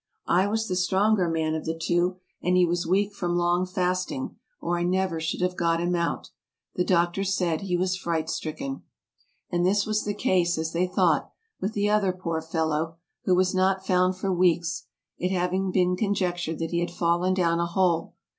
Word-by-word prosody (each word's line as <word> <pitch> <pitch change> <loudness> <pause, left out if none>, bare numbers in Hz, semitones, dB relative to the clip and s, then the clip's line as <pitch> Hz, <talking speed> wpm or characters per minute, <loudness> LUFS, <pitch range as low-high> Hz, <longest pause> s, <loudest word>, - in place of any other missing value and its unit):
I 185 +3 +3
was 220 +2 -1
the 185 - -1
stronger 190 +1 +2
man 160 -1 0
of 160 - -3
the 160 0 -2
two, 175 +2 +1 0.2
and 180 +1 +2
he 180 - +5
was 175 0 -1
weak 200 +3 +1
from 175 -3 -1
long 175 +1 +2
fasting, 185 +9 -2 0.2
or 175 0 -1
I - - -2
never 180 -1 0
should 160 +2 -2
have 180 0 0
got 170 -1 +1
him 175 +1 0
out. 170 -1 -2 0.4
The 180 - +1
doctor 175 +1 +1
said 180 -4 0
he 180 -3 -1
was 185 +1 0
fright 170 -4 -2
stricken." 270 - -4 0.7
And 175 -1 +1
this 200 +2 +2
was 215 -1 0
the 205 0 -2
case, 175 -4 +1
as 160 0 -2
they 175 +2 +1
thought, 180 - +2 0.3
with 205 +3 -2
the 205 0 +1
other 205 -3 +2
poor 170 -3 -3
fellow, 160 0 -1 0.3
who 185 - +4
was 185 +1 +2
not 190 0 +1
found 185 0 +2
for 190 0 -1
weeks, 175 -1 +1 0.3
it 180 - 0
having 185 +1 0
been 180 -1 +2
conjectured 180 -5 -1
that 165 -1 -3
he 170 - +1
had 175 0 -1
fallen 175 +2 +1
down 170 -2 +2
a 170 - +1
hole. 170 -1 +1
180 Hz, 195 wpm, -26 LUFS, 170-190 Hz, 0.7 s, he